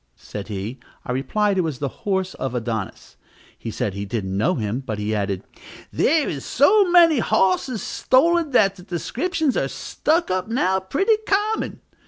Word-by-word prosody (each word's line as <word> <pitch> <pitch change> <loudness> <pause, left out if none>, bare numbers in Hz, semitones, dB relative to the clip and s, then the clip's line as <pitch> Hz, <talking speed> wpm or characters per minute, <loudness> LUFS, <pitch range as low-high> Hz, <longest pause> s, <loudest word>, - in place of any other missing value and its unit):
said 100 -1 -8
he. 105 +5 -5 0.3
I - - -3
replied 195 +10 0
it - - +2
was 155 -5 -3
the 140 - -2 0.2
horse 190 -1 0
of 130 -2 -4
Adonis. 115 -4 -4 0.4
He - - -7
said 100 - -2
he 100 +1 -4
didn't 100 -3 -3
know 140 - +1
him; 110 +1 -2
but, 115 -6 -5
he 105 +1 -2
added, 100 -3 -2 0.5
"there 310 -1 +2
is 140 -3 -4
so 385 - +4
many 335 -5 +6
hosses 215 +2 +1
stolen, 330 +5 +2
that 200 -7 +3
the - - -11
descriptions 270 - -2
are - - +1
stuck 330 - -1
up 185 +1 -1
now 190 -5 +1
pretty 340 - +1
common." 415 +2 0
190 Hz, 170 wpm, -22 LUFS, -, 0.5 s, many